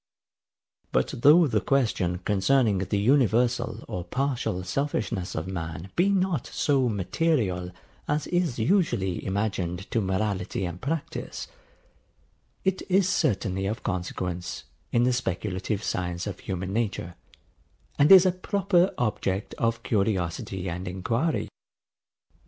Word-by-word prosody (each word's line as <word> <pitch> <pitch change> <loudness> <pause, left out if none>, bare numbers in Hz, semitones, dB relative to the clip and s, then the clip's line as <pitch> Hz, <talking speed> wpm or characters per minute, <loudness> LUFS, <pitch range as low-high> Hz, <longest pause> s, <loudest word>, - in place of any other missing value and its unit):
But - - +1
though 155 +7 +7
the 110 -7 +1
question 110 -10 +1
concerning 105 +1 +3
the 95 +2 -1
universal 120 +1 +2
or 90 - -4
partial 120 -3 -1
selfishness 100 -4 -2
of 80 - -2
man 85 0 -5
be 180 +3 +3
not 185 -7 +1
so 135 -4 +1
material 100 - 0 0.4
as 150 0 0
is 175 -7 0
usually 115 - +1
imagined 95 -2 -2
to 115 - +1
morality 95 -1 -1
and 85 0 -6
practice, 155 +2 -4 1.2
it 190 -1 0
is 190 0 +4
certainly 100 - 0
of 110 +2 -4
consequence 90 -1 -3 0.3
in 120 - +3
the 125 +1 +3
speculative 100 -2 -2
science 90 -3 -2
of 100 -3 -5
human 95 0 -4
nature, 105 -6 -2 0.9
and 145 +4 +5
is 190 -1 +10
a 185 - +4
proper 185 0 +1
object 105 -4 -1
of 115 0 0
curiosity 95 -3 -1
and 90 +2 -4
enquiry. 115 - -1
105 Hz, 120 wpm, -26 LUFS, 95-140 Hz, 1.2 s, is